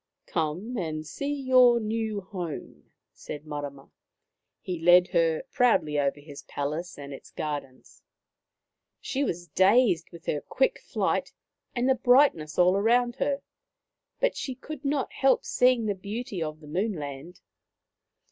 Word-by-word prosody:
" -, -, -59 dB
Come 175 Hz, +9 st, -2 dB
and 155 Hz, -3 st, -3 dB
see 280 Hz, -, -4 dB
your 255 Hz, -4 st, +5 dB
new 220 Hz, -1 st, -2 dB
home," 180 Hz, -5 st, -7 dB, 0.2 s
said 150 Hz, +1 st, -8 dB
Marama. 145 Hz, -2 st, -7 dB, 0.7 s
He 180 Hz, -3 st, -5 dB
led 175 Hz, +2 st, +6 dB
her 165 Hz, -2 st, +2 dB
proudly 155 Hz, -12 st, +2 dB
over 140 Hz, 0 st, 0 dB
his 145 Hz, -1 st, -10 dB
palace 150 Hz, +5 st, -4 dB
and 140 Hz, -1 st, -8 dB
its 135 Hz, -, -11 dB
gardens. 145 Hz, -4 st, -6 dB, 1.0 s
She 275 Hz, +1 st, -2 dB
was 175 Hz, -8 st, -3 dB
dazed 190 Hz, -, +4 dB
with 170 Hz, -2 st, -13 dB
her 145 Hz, -, -1 dB
quick 265 Hz, -, 0 dB
flight -, -, -1 dB, 0.4 s
and 245 Hz, +1 st, +1 dB
the 265 Hz, -, +5 dB
brightness 245 Hz, -, +3 dB
all 180 Hz, +1 st, +5 dB
around 240 Hz, +4 st, +2 dB
her, 280 Hz, -1 st, -1 dB, 0.8 s
but -, -, +1 dB
she 260 Hz, -, -4 dB
could 290 Hz, +3 st, -9 dB
not 280 Hz, -1 st, -1 dB
help 270 Hz, -1 st, +2 dB
seeing 250 Hz, -2 st, +3 dB
the 205 Hz, -, +1 dB
beauty 200 Hz, 0 st, -5 dB
of 155 Hz, 0 st, -4 dB
the 150 Hz, -, -13 dB
Moon 190 Hz, +8 st, -1 dB
land. 145 Hz, +2 st, -7 dB
185 Hz, 145 wpm, -27 LUFS, 155-245 Hz, 1.0 s, led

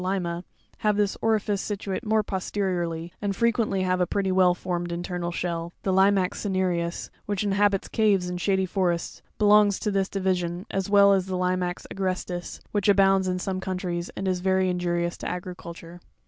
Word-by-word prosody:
Lima, 180 Hz, -2 st, -2 dB, 0.4 s
have 210 Hz, -1 st, +1 dB
this 205 Hz, -1 st, +1 dB
orifice 215 Hz, -2 st, +1 dB
situate 200 Hz, -2 st, -3 dB
more 215 Hz, 0 st, +2 dB
posteriorly, 180 Hz, -4 st, -2 dB
and 200 Hz, -1 st, -1 dB
frequently 230 Hz, -4 st, +1 dB
have 185 Hz, 0 st, +1 dB
a 180 Hz, -, +2 dB
pretty 195 Hz, -2 st, 0 dB
well 185 Hz, -1 st, +4 dB
formed 175 Hz, -1 st, -3 dB
internal 175 Hz, 0 st, -3 dB
shell; 170 Hz, -1 st, -3 dB
the 190 Hz, -, +1 dB
Limazx 190 Hz, -1 st, +3 dB
cinereus, 180 Hz, -4 st, -1 dB, 0.2 s
which 205 Hz, -1 st, -1 dB
inhabits 200 Hz, -1 st, +2 dB
caves 205 Hz, -5 st, +2 dB
and 180 Hz, 0 st, -4 dB
shady 190 Hz, -1 st, +2 dB
forests, 180 Hz, -2 st, -1 dB, 0.2 s
belongs 210 Hz, -1 st, +5 dB
to 210 Hz, -, -2 dB
this 195 Hz, -1 st, 0 dB
division, 185 Hz, -2 st, -1 dB
as 195 Hz, 0 st, -2 dB
well 200 Hz, -1 st, +6 dB
as 190 Hz, -1 st, +1 dB
the 185 Hz, -1 st, -2 dB
Lima 180 Hz, -1 st, 0 dB, 0.2 s
agrestis, 185 Hz, -2 st, -3 dB
which 205 Hz, -1 st, +1 dB
abounds 195 Hz, -1 st, +4 dB
in 180 Hz, 0 st, 0 dB
some 185 Hz, 0 st, -3 dB
countries, 180 Hz, -2 st, -3 dB
and 195 Hz, -, -2 dB
is 185 Hz, -1 st, +1 dB
very 190 Hz, 0 st, +2 dB
injurious 175 Hz, -1 st, -1 dB
to -, -, -4 dB
agriculture. 175 Hz, -1 st, -7 dB
185 Hz, 170 wpm, -26 LUFS, 180-200 Hz, 0.4 s, well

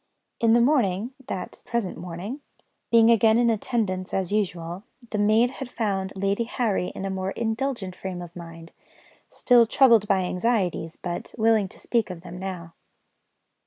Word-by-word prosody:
In 230 Hz, -1 st, +4 dB
the 235 Hz, -, +5 dB
morning 235 Hz, -4 st, +2 dB
(that 185 Hz, -, -6 dB
present 235 Hz, -6 st, -2 dB
morning), 180 Hz, -, -6 dB, 0.5 s
being 230 Hz, 0 st, +6 dB
again 225 Hz, 0 st, +5 dB
in 235 Hz, -1 st, +4 dB
attendance 205 Hz, -5 st, -2 dB
as 190 Hz, -1 st, -1 dB
usual, 175 Hz, -4 st, -2 dB, 0.3 s
the 210 Hz, -, -1 dB
maid 220 Hz, +4 st, +4 dB
had 270 Hz, -1 st, -7 dB
found 195 Hz, -5 st, -2 dB
Lady 200 Hz, +4 st, 0 dB
Harry 225 Hz, -6 st, -1 dB
in 195 Hz, -, -5 dB
a 195 Hz, -, -2 dB
more 190 Hz, 0 st, -2 dB
indulgent 225 Hz, -4 st, -2 dB
frame 185 Hz, -2 st, -6 dB
of 170 Hz, 0 st, -12 dB
mind; 165 Hz, -1 st, -10 dB, 0.6 s
still 240 Hz, -2 st, +4 dB
troubled 230 Hz, -4 st, +5 dB
by 195 Hz, -1 st, +3 dB
anxieties, 180 Hz, -4 st, -1 dB
but 175 Hz, -1 st, -5 dB
willing 220 Hz, -3 st, +3 dB
to -, -, -13 dB
speak 230 Hz, -4 st, 0 dB
of 180 Hz, -2 st, -7 dB
them 180 Hz, 0 st, -9 dB
now. 180 Hz, -3 st, -6 dB
200 Hz, 160 wpm, -25 LUFS, 180-230 Hz, 0.6 s, being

